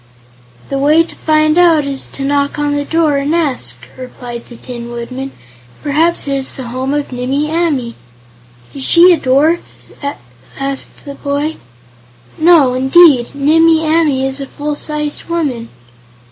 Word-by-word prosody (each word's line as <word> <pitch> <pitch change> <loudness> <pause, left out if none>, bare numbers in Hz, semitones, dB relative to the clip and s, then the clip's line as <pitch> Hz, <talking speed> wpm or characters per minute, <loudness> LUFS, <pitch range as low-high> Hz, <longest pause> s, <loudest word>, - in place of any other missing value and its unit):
"The 275 - -2
way 305 +4 +4
to 330 - -12
find 310 +1 +2
out 330 -4 +4
is 275 -1 -3
to 275 - -6
knock 280 +1 0
on 290 -1 0
the 290 0 -2
door 320 -3 +1
and 285 +4 0
ask," 300 -7 -1 0.2
replied 245 -2 -9
the 240 - -12
Tin 235 0 -8
Woodman. 255 +3 -6 0.5
"Perhaps 315 +3 +1
it 275 0 0
is 265 -1 -3
the 255 -3 -7
home 260 +2 -3
of 290 -2 -3
Nimmie 270 +5 -2
Amee." 300 -8 -1 0.8
"Is 275 - -6
she 345 +5 +6
a 330 - 0
dwarf?" 290 +6 +2 1.0
asked 275 0 -5
the 280 - -7
boy. 285 +3 -3 0.8
"No, 315 -6 +5
indeed; 265 0 +4
Nimmie 320 +3 +3
Amee 310 -4 +2
is 270 +1 -3
a 275 - -5
full 295 +2 -4
sized 300 0 -4
woman." 285 -9 -3
285 Hz, 150 wpm, -14 LUFS, 265-315 Hz, 1.0 s, she